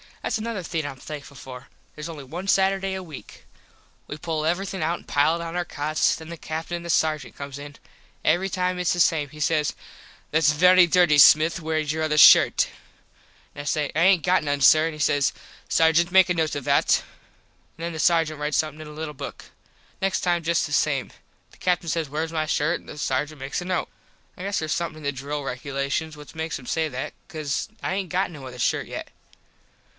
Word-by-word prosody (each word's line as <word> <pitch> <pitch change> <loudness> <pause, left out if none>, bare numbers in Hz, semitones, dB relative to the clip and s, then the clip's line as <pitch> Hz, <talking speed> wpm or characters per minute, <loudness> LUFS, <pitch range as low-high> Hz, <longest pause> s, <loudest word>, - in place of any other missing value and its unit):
Thats - - -1
another 220 -4 -4
thing 165 -1 -3
Im 145 - -5
thankful 145 +1 -9
for. 130 +1 -10 0.3
Theres 150 +1 -6
only 155 -4 -8
one 170 +8 -7
Saturday 195 0 +2
a 190 0 -5
weak. 150 -11 -12 0.6
We 145 - -6
pull 155 0 -3
everything 190 +2 -1
out 165 +2 -1
an - - -19
pile 145 +3 +2
it - - -4
on 165 0 -6
our 175 0 -1
cots. 155 0 0
Then 160 0 -10
the 170 - -7
Captin 160 +2 -4
an 170 - -9
the 170 - -7
Sargent 155 -4 0
comes 140 -1 -7
in. 145 0 -9 0.5
Every 190 +3 +2
time 180 -1 -1
its 180 - +1
the 175 - -3
same. 155 -4 +2
He 150 - -13
says 150 -1 +1 0.6
"Thats 150 -1 +3
very 180 +3 +6
dirty 175 -3 +4
Smith 155 +3 +6
wheres 155 -2 -1
your 160 0 -3
other 155 -1 0
shirt." - - +7 0.9
An 145 - -7
I - - -8
say 150 0 -1
"I - - +1
aint 185 -2 +5
got 180 -2 +3
none, 145 -1 -1
sir." 155 +5 +6
An 165 - -4
he 155 - -10
says 145 -2 +2 0.4
"Sargent 165 +2 +3
make 190 0 +6
a - - +3
note 160 -2 -1
of 145 - -4
that." - - +3 0.8
An 165 - -8
then 170 0 -3
the 160 - -6
Sargent 160 -2 +2
rites 150 0 -1
somethin 155 0 -2
in 155 - -9
a - - -9
little 150 0 -6
book. - - -8 0.6
Next 195 0 0
time 175 -2 0
just 170 +1 +1
the 145 - -8
same. 145 -2 0 0.4
The - - -20
Captin 180 -2 0
says 160 -3 -1
wheres 160 +3 -3
my 155 -1 -1
shirt 155 +2 0
an - - -21
the - - -9
sargent 145 +2 -2
makes 135 +6 -4
a - - -7
note. 185 -1 -1 0.5
I 180 - -8
guess 200 +1 -1
theres 155 -1 -3
somethin 170 -1 -2
in 155 - -12
the 140 - 0
drill 145 +2 -5
regulations 140 +4 -3
what 150 -1 -12
makes 160 0 -4
him 130 - -13
say 160 -1 0
that 130 -1 -5
cause 155 +2 -3
I 190 - -1
aint 190 -2 -3
got 185 0 0
no 140 -5 -9
other 125 -1 -10
shirt - - 0
yet. - - -7
155 Hz, 220 wpm, -24 LUFS, 145-175 Hz, 0.9 s, shirt